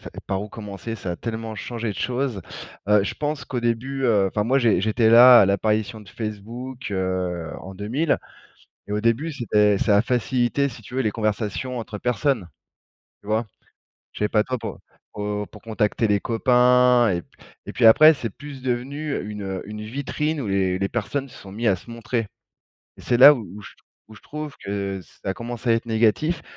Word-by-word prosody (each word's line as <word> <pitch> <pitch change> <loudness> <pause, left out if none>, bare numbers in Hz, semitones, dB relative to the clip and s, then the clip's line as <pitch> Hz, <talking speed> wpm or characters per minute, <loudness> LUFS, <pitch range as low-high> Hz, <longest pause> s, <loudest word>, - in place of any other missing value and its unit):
ça - - -10 0.2
par 95 -1 -1
où 105 - -7
commencer? 105 +2 -7
Ça 95 -4 -4
a 85 - -6
tellement 110 -1 -5
changé 115 +1 -5
de - - -5
choses. 125 -5 -2 0.5
Heu, 105 -1 +4
je - - -3
pense 150 0 -3
qu'au 125 - -3
début, 120 +4 -2
heu, 105 -5 +3
enfin 105 +2 -1
moi, 130 +6 +2
j'ai 115 -8 +3
j'étais 110 +3 +2
là 120 +2 +9
à - - +4
l'apparition 105 +2 0
de 105 - -15
Facebook, 115 +5 -6
heu, 90 -3 -2
en 95 +1 -9
2000 120 - 0 0.7
et 105 - -7
au 105 - -1
début 115 +8 +1
c'était 105 -6 +2
ça 105 -3 +3
a - - +5
facilité, 125 +3 0
si 115 - -12
tu 115 - -13
veux, 130 - +1
les 110 -4 0
conversations 110 +3 -2
entre 110 -2 -6
personnes, 120 -2 0 0.7
tu 100 - -17
vois? 110 +2 0 0.7
Je - - -10
sais 105 - +1
pas 105 -1 +3
toi, 130 -1 -3
pour - - -7 0.3
pour, 105 - -5
heu, 105 0 -2
pour 105 - -13
contacter 110 0 0
les 100 -1 +1
copains 125 0 +4
et, 85 -1 -1
p - - -28 0.4
et - - -7
puis 120 - +2
après 155 +8 +8
c'est 120 -5 -4
plus 140 +5 -11
devenu 135 +4 -2
une, 105 -1 -6
heu, 95 -1 -4
une 105 0 -7
vitrine 140 +6 -3
où 125 - -4
les 95 -2 0
les 100 - 0
personnes 130 +7 -3
se - - -15
sont 95 - -12
mis 115 +3 -2
à 100 - +4
se 90 - -15
montrer 115 -1 -3 0.7
et - - -11
c'est 120 - +1
là 135 +4 +10
où 115 -6 -7
où 105 - -10
je - - -11
t - - -23 0.3
où 110 - -13
je - - -15
trouve 150 -1 -7
que 100 -1 -3
ça 95 - -8
a - - -2
commencé 120 0 -4
à - - +6
être 115 +1 -2
négatif, 115 +9 +1
115 Hz, 210 wpm, -23 LUFS, 105-125 Hz, 0.7 s, là